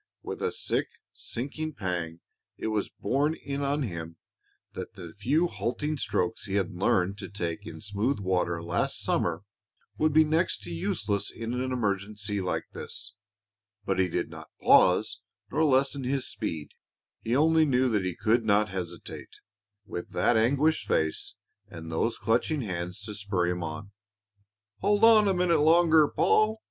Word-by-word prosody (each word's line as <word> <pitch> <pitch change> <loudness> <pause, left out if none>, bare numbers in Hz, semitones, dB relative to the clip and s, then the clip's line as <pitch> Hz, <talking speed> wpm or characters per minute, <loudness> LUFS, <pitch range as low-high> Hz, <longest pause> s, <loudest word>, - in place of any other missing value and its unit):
With - - -6
a - - 0
sick, - - 0 0.3
sinking 150 +5 -3
pang 85 -4 -3 0.4
it - - -3
was 105 -2 -1
borne 140 +8 0
in 140 -2 -5
on 140 +1 0
him 85 -6 -6 0.6
that - - -7
the 85 -3 -9
few 140 +12 +2
halting 150 - -2
strokes 90 -6 -1
he 100 -2 -3
had 100 0 0
learned 95 +2 +1
to - - -6
take 95 0 -4
in - - -8
smooth 105 +6 -1
water 90 -3 0
last 85 +1 -1
summer 85 +1 0 0.6
would 155 0 +3
be 155 +2 +6
next 155 - 0
to 85 - -5
useless 100 +4 -1
in 115 +1 -5
an 130 +1 -2
emergency 105 -3 -2
like 90 - -1
this. - - -5 0.7
But 95 -1 0
he 95 - +3
did - - -1
not - - -11
pause - - +4 0.3
nor 155 +4 +2
lessen 135 0 +2
his 130 +1 -1
speed. 80 -9 -4 0.5
He 115 +2 -1
only 160 +3 +5
knew 130 -2 +3
that 105 -4 +1
he 90 -2 -2
could 115 +2 +2
not 105 0 +3
hesitate, 90 -2 -6 0.5
with 85 - -7
that 120 - +3
anguished 140 +8 +2
face 80 0 0 0.3
and 80 -1 -9
those 115 +8 0
clutching 120 +8 +1
hands 90 -2 -4
to 105 0 -6
spur 100 -3 -1
him 90 0 -1
on. 80 +5 -6 0.9
"Hold 205 - +2
on 220 -2 +7
a 195 - +3
minute 175 -3 +3
longer, 160 -1 +6
Paul!" 215 +7 +2
105 Hz, 160 wpm, -28 LUFS, 90-140 Hz, 0.9 s, on